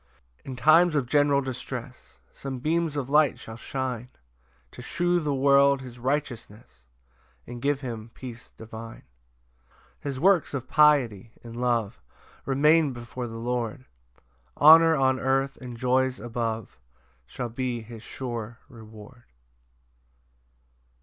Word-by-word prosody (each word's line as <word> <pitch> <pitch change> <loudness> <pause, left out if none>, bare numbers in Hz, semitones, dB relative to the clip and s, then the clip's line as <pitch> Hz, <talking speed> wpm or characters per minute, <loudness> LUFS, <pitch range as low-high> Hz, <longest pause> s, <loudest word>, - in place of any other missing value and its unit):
4 - - -34
In 130 - -6
times 155 +7 +5
of 140 -3 +1
general 145 +1 +3
distress, 125 -1 -7 0.2
Some 135 -1 -6
beams 160 +3 -1
of 140 -3 -2
light 150 +1 +3
shall 110 - -10
shine 125 0 -4 0.6
To - - -11
shew 175 +6 0
the 150 -3 -2
world 140 0 +4
his 125 -1 -11
righteousness, 120 - -4 0.6
And 120 0 -9
give 140 +1 0
him 115 -4 -6
peace 120 -3 -10
divine. 110 0 -10 0.9
5 - - -40
His 140 -2 -4
works 180 -4 +3
of 130 -2 -5
piety 130 -8 +3
and 115 -1 -10
love 120 - -1 0.5
Remain 150 +2 +3
before 120 +1 -6
the 115 0 -8
Lord; 120 +2 -3 0.7
Honour 160 +2 +8
on 130 -2 +2
earth 135 +1 0
and 125 -2 -9
joys 130 +1 +1
above 115 - -4 0.5
Shall 120 - -5
be 120 0 -3
his 115 0 -11
sure 120 -2 -6
reward. 110 +1 -14
130 Hz, 130 wpm, -26 LUFS, 115-140 Hz, 0.9 s, Honour